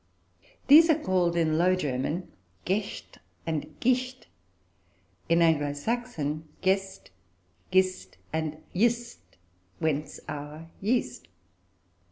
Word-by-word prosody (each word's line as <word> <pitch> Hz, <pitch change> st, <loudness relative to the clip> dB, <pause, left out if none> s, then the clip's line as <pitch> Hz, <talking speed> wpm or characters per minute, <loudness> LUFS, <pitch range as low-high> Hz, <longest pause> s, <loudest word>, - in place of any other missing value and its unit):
These 320 Hz, +4 st, +8 dB
are 315 Hz, -, +5 dB
called, 185 Hz, -, +1 dB
in 160 Hz, -2 st, +2 dB
Low 185 Hz, +2 st, +4 dB
German, 150 Hz, +2 st, -2 dB, 0.3 s
"gäscht" 200 Hz, +2 st, -3 dB, 0.3 s
and 155 Hz, -2 st, -3 dB
"gischt"; 255 Hz, +1 st, 0 dB, 1.0 s
in 170 Hz, 0 st, +5 dB
Anglo 145 Hz, -3 st, +2 dB
Saxon, 160 Hz, -5 st, -3 dB, 0.2 s
"gest," 190 Hz, -, 0 dB, 0.6 s
"gist," 185 Hz, 0 st, +1 dB, 0.2 s
and 155 Hz, -1 st, -3 dB
"yst," 235 Hz, +4 st, +1 dB, 0.6 s
whence 150 Hz, 0 st, -2 dB
our 150 Hz, +2 st, -7 dB
"yeast." 210 Hz, -, -1 dB
175 Hz, 95 wpm, -28 LUFS, 155-215 Hz, 1.0 s, These